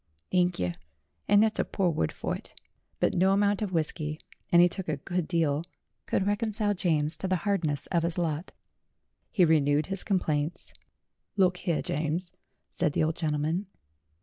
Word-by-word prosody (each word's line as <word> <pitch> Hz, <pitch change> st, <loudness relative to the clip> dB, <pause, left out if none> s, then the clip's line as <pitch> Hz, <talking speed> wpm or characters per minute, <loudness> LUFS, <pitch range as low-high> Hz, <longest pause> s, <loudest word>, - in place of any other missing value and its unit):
"Thank 180 Hz, -1 st, +2 dB
yer, 90 Hz, -1 st, -1 dB, 0.5 s
and 205 Hz, +1 st, +6 dB
that's 220 Hz, -1 st, 0 dB
a -, -, +4 dB
pore 185 Hz, -4 st, 0 dB
word 80 Hz, -, 0 dB
fur -, -, -3 dB
it." -, -, -9 dB, 0.4 s
But -, -, +2 dB
no 190 Hz, +2 st, +3 dB
amount 205 Hz, +1 st, +2 dB
of 205 Hz, -3 st, -2 dB
whisky 155 Hz, -2 st, -2 dB, 0.3 s
and 175 Hz, -, +7 dB
he 175 Hz, -, +8 dB
took 180 Hz, 0 st, -5 dB
a 150 Hz, -, 0 dB
good 175 Hz, +3 st, -2 dB
deal 160 Hz, -4 st, +1 dB, 0.4 s
could 190 Hz, -, +1 dB
reconcile 205 Hz, 0 st, 0 dB
James 160 Hz, -5 st, +1 dB
to 190 Hz, -, -3 dB
the 185 Hz, -, +2 dB
hardness 165 Hz, -9 st, 0 dB
of 170 Hz, -2 st, +3 dB
his 170 Hz, 0 st, -1 dB
lot. 165 Hz, 0 st, -2 dB, 0.8 s
He 185 Hz, -6 st, +4 dB
renewed 150 Hz, -2 st, +3 dB
his 195 Hz, -, -4 dB
complaints. 160 Hz, -5 st, -1 dB, 0.6 s
"Look 185 Hz, -2 st, +3 dB
here, 170 Hz, -3 st, -1 dB
James," 160 Hz, +4 st, -2 dB, 0.4 s
said 160 Hz, -4 st, 0 dB
the -, -, +2 dB
old 160 Hz, 0 st, 0 dB
gentleman. 160 Hz, +4 st, -1 dB
175 Hz, 170 wpm, -28 LUFS, 155-190 Hz, 0.8 s, he